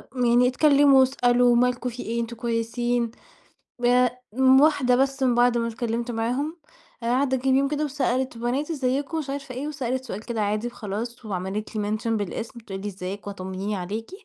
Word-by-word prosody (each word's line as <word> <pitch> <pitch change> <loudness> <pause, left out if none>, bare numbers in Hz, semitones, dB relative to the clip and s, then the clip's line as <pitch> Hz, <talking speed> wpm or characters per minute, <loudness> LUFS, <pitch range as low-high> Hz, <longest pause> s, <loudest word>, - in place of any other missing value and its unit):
م 250 -1 +1
يعني 240 +1 +5
اتكلموا 280 0 +5
واسألوا، 245 -2 +4
مالكوا، 250 0 +1
في 245 - -7
إيه، 235 +1 -2
أنتم 235 +1 -5
كويسين، 235 0 -1 0.8
آآ 250 0 +3 0.2
م 265 0 +6
واحدة 275 -5 +4
بس 270 +1 0
من 250 -2 +3
بَعد 240 0 +3
ما 230 0 0
اتكلمت 235 +1 -3
معاهم، 250 +8 -2 0.5
آآ - - -3
عدّى 260 +2 +2
كام 260 +1 +1
يوم 275 0 +2
كده 300 +1 -1
وسألت، 260 -3 -1
بنات 255 +7 -1
إزيكوا، 280 +2 -1
مش 280 -3 -4
عارفة 275 -2 -5
إيه، 280 +4 -4
وسألت 260 -3 -3
سؤال 210 -4 -5
كده 230 -3 -2
عادي 210 +3 -1
وخلاص، 230 +1 -5
وعملت 200 +2 -4
لي 210 -1 -1
mention 230 - -4
بالاسم، 220 0 -2
بتقول 195 -4 -7
لي 205 - -4
إزيك 195 +1 -6
وطمنيني 195 +1 -4
عليكِ، 205 - -5
245 Hz, 180 wpm, -25 LUFS, 225-265 Hz, 0.8 s, م